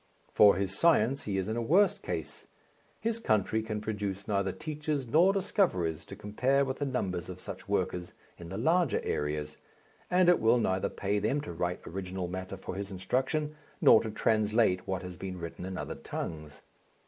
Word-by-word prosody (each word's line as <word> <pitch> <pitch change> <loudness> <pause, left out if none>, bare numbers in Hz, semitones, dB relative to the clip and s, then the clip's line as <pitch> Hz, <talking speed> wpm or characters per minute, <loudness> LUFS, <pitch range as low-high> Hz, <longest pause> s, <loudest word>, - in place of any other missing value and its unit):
For 105 -1 +7
his 95 +1 -1
science 135 -3 +3
he 100 -2 -1
is 95 0 -1
in 110 - -2
a 120 - -1
worse 180 - +4
case. - - -5 0.5
His 230 0 -1
country 110 - +1
can 110 -1 -4
produce 100 -2 -3
neither 100 -2 +1
teachers 150 - -3
nor 165 +10 +5
discoverers 95 - 0
to - - -9
compare 130 +7 +1
with 130 0 -4
the 145 - -1
numbers 95 -10 -2
of - - -7
such - - -8
workers 90 0 -1 0.3
in 85 -1 -9
the 95 - -5
larger 165 - +2
areas, 75 0 -2 0.5
and 180 0 +4
it 180 - +6
will 115 +2 +4
neither 95 -5 0
pay 100 +1 -1
them 140 +8 +1
to 85 - -7
write 90 +2 -3
original 95 0 -4
matter 95 +2 -5
for 95 - -6
his 100 +1 -4
instruction 130 - -1 0.2
nor - - +7
to 110 - -4
translate 110 -3 +2
what 95 -1 -2
has 90 -1 -7
been 95 -1 -5
written 85 +1 -6
in 95 -1 -5
other - - -4
tongues. 75 -2 -6
105 Hz, 185 wpm, -30 LUFS, 95-135 Hz, 0.5 s, For